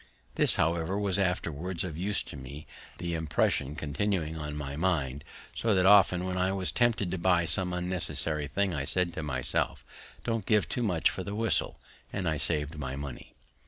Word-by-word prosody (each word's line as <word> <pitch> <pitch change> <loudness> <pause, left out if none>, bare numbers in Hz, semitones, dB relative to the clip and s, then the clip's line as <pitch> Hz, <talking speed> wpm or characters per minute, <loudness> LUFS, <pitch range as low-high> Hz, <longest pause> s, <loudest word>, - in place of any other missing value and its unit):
This, - - +4
however, 85 +4 +1
was 100 -2 +1
afterwards 90 -2 -1
of 85 -5 -5
use 95 +5 +1
to - - -9
me, 70 +3 -9 0.3
the 85 -1 -3
impression 75 -3 0
continuing 80 +1 -1
on 75 -2 -5
my 70 -2 -5
mind; 75 -5 -1 0.3
so 110 -3 +1
that 90 -1 +3
often, 95 -2 +6
when 90 0 -2
I 95 +1 +2
was 95 -2 -1
tempted 115 -6 +1
to 95 - -2
buy 85 -1 +3
some 90 +1 +1
unnecessary 90 -4 0
thing, 100 +4 0
I 70 -3 -2
said 85 +4 +2
to - - -4
myself, 65 -5 -1 0.4
Don't 115 -4 -2
give 105 -2 +3
too 125 - -1
much 90 -8 +2
for 95 - -5
the 100 +2 -5
whistle; 115 +1 0 0.3
and 95 -3 -2
I 80 -1 +1
saved 75 0 -1
my 65 -2 -4
money. 70 -2 -8
85 Hz, 185 wpm, -29 LUFS, 75-95 Hz, 0.4 s, often